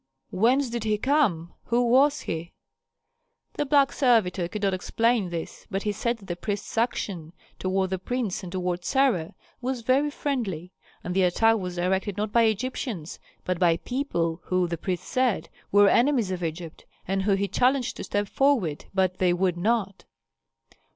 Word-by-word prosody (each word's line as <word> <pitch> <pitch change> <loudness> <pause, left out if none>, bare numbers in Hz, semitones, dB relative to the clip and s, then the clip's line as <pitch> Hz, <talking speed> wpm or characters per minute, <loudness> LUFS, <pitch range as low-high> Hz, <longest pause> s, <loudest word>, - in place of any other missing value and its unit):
Whence 245 +6 +2
did 235 -2 -3
he 215 -1 +1
come? 210 - +1
Who 240 +1 +2
was 280 +5 +4
he?" 165 +1 -5 1.0
The 290 - -2
black 275 -1 +4
servitor 210 -9 +2
could 210 +4 -6
not 195 -1 +2
explain 225 +2 +1
this, 170 -1 -6
but 195 -1 -2
he 210 - 0
said 235 +4 -1
that 200 - -15
the 175 - -4
priest's 200 +3 -4
action 195 -8 -2 0.3
toward 190 0 0
the 190 - -1
prince 235 -1 -2
and 180 -3 -8
toward 180 -1 -2
Sarah 255 - +1 0.3
was 255 -1 -2
very 270 +5 +2
friendly; 215 - -3 0.3
that 180 - -3
the 190 - +2
attack 225 +5 +3
was 180 -2 -5
directed 190 +3 -1
not 210 0 -2
by 230 +1 +4
Egyptians, 220 - -3 0.3
but 180 -2 -1
by 170 -2 +4
people 170 - -2
who, 185 -1 +1
the 170 - -2
priest 180 +2 -3
said, 255 -4 0 0.2
were 205 0 +6
enemies 240 -3 +3
of 180 -1 -3
Egypt, 165 0 -5 0.2
and 195 +1 0
whom 195 0 +2
he 200 +1 0
challenged 250 +5 +1
to - - -5
step 205 0 -1
forward, 230 - +1
but 185 -1 +1
they 180 -1 +3
would 180 0 +1
not. 200 +1 -1
200 Hz, 170 wpm, -26 LUFS, 180-240 Hz, 1.0 s, were